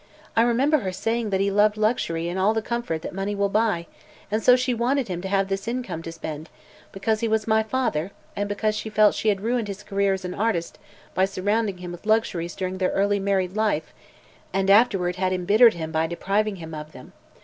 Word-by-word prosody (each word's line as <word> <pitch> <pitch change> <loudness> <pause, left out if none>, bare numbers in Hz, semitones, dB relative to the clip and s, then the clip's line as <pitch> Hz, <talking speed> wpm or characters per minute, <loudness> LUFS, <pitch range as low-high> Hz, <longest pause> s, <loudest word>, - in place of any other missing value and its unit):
I 225 - +5
remember 260 +6 +3
her 190 -6 -3
saying 225 +4 -1
that 190 -1 +1
he 200 0 +1
loved 210 +1 +3
luxury 190 -7 0
and 175 +2 -3
all 205 +4 +3
the 225 - +1
comfort 235 -10 -3
that - - -6
money 195 +2 -2
will 200 0 +1
buy, 210 -4 +1 0.5
and 215 +1 +1
so 250 +3 +7
she 255 0 0
wanted 245 +1 0
him 175 -1 -3
to 190 - -4
have 195 0 +1
this 195 +1 -3
income 240 -8 -3
to 165 - -7
spend, 160 -1 -7 0.4
because 215 +3 -1
he 230 - 0
was 220 -1 +1
my 220 0 +3
father 220 -8 -1 0.3
and 205 0 -2
because 215 +1 0
she 215 +1 -4
felt 210 0 +4
she 220 - 0
had 195 -2 0
ruined 235 0 0
his 200 0 -7
career 200 -1 +1
as 190 -1 -4
an 180 - -4
artist 200 -6 -1 0.3
by 190 - +3
surrounding 200 +1 -1
him 180 -1 -7
with 175 +4 -10
luxuries 185 -6 0
during 185 0 -3
their 185 - +2
early 200 +1 +2
married 195 -1 0
life, 215 -8 0 0.6
and 195 +1 +2
afterward 195 -5 +4
had 185 0 0
embittered 205 +5 +5
him 160 -1 -5
by 160 0 +1
depriving 200 +5 -1
him 160 -3 -9
of 150 0 -8
them. 130 - -13
200 Hz, 220 wpm, -24 LUFS, 180-220 Hz, 0.6 s, so